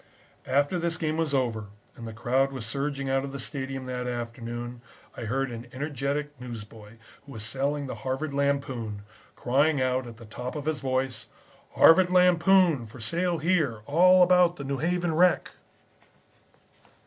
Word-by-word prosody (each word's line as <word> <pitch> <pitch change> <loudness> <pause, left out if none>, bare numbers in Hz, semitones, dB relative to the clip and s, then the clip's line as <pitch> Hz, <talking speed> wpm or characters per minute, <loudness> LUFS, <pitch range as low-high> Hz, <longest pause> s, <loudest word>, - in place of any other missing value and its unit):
After 145 +6 +1
this 170 -1 -1
game 155 -1 -1
was 165 -3 0
over 120 -6 0 0.3
and 115 - -8
the - - -6
crowd 130 +5 +1
was 130 -4 -5
surging 140 +3 -3
out 135 0 +1
of 140 - -5
the 140 - -6
stadium 135 -1 -4
that 125 -1 -4
afternoon 120 0 -5 0.3
I 120 - -6
heard 135 +3 -1
an 120 +1 -8
energetic 145 +1 -3
newsboy, 110 -3 -9 0.3
who 140 -1 -12
was 110 - -7
selling 140 +4 -1
the 130 - -5
Harvard 135 +3 -3
Lampoon, 135 -7 -1 0.3
crying 140 +4 +2
out 130 -1 0
at 115 -1 -10
the 115 - -12
top 125 +5 -6
of 145 -2 -5
his 155 -3 -1
voice: 130 -1 -2 0.5
"'Harvard 180 +2 +7
Lampoon 180 -6 +4
for 115 +4 -13
sale 170 +10 0
here. 155 -9 0
All 180 +6 +6
about 180 -1 +4
the 140 - -7
New 135 -1 -3
Haven 175 +2 0
wreck.'" 180 +2 +3
135 Hz, 160 wpm, -27 LUFS, 120-155 Hz, 0.5 s, Harvard